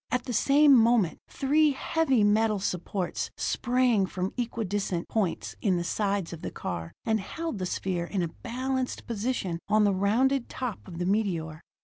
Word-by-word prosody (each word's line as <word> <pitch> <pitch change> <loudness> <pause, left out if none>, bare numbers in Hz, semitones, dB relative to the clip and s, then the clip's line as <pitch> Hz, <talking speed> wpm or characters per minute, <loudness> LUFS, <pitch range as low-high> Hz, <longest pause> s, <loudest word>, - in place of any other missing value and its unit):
At 250 0 0
the 250 - -4
same 285 +5 +5
moment, 230 -6 +3
three 295 +2 +2
heavy 270 -4 +1
metal 215 +1 +3
supports 185 -1 -2
sprang 245 -5 +2
from 185 +1 -3
equi 235 -2 -2
distant 190 -3 -2
points 115 - -2
in 185 -2 +2
the 175 - -1
sides 200 -1 -1
of 165 - -8
the - - -4
car, 85 -2 -5
and 220 -1 +2
held 320 +4 -5
the 185 - -2
sphere 175 -1 -2
in 185 0 -2
a - - 0
balanced 255 +1 -3
position 210 -6 -2
on 215 0 +4
the 205 -1 +3
rounded 235 +7 +2
top 250 -4 -4
of 175 -3 -8
the 175 - -2
meteor. 175 -6 -1
210 Hz, 170 wpm, -28 LUFS, 185-250 Hz, -, same